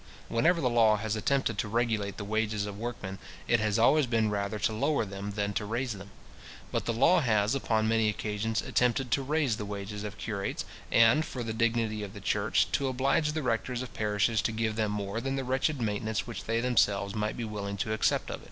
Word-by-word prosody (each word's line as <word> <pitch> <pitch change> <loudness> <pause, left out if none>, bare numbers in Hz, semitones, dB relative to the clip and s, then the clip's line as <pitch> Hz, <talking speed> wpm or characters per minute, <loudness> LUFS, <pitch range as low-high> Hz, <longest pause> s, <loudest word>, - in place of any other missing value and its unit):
Whenever 160 +10 +3
the 130 - +1
law 115 -3 +4
has 110 +1 -2
attempted 115 -1 0
to - - 0
regulate 110 -3 -1
the 105 - -4
wages 110 0 0
of 105 -1 -6
workmen, 105 -5 -5 0.3
it 120 - +3
has 105 0 +1
always 135 +5 +4
been 110 -3 +1
rather 100 +1 -2
to 110 - 0
lower 140 +2 +1
them 100 +1 -6
than 100 0 -1
to 105 - -1
raise 120 +4 -2
them. 100 0 -10 0.6
But - - -1
the - - +2
law 150 +11 +5
has, 110 -4 +2
upon 110 -5 +1
many 110 -1 +3
occasions, 105 +1 -2
attempted 125 0 +1
to 140 - +2
raise 140 -4 0
the 105 - -4
wages 100 0 -5
of 105 0 -6
curates, 100 -3 -3 0.3
and, 115 +7 +5
for 130 -5 -5
the 110 -1 -3
dignity 115 -1 0
of 100 -1 -7
the - - -7
church, 95 - +1
to 140 - +1
oblige 140 +4 +1
the 155 -1 -2
rectors 125 +1 -1
of 130 - -9
parishes 105 0 +1
to 115 - 0
give 110 0 -1
them 110 -1 0
more 105 +2 -3
than 135 +2 -2
the 135 - -2
wretched 130 +3 0
maintenance 110 -1 -1
which 115 -5 -7
they 115 +1 0
themselves 105 -5 +2
might 105 0 -2
be 120 - -3
willing 100 -2 -4
to 110 +2 -1
accept 110 - +1
of. - - -5
110 Hz, 215 wpm, -29 LUFS, 105-120 Hz, 0.6 s, law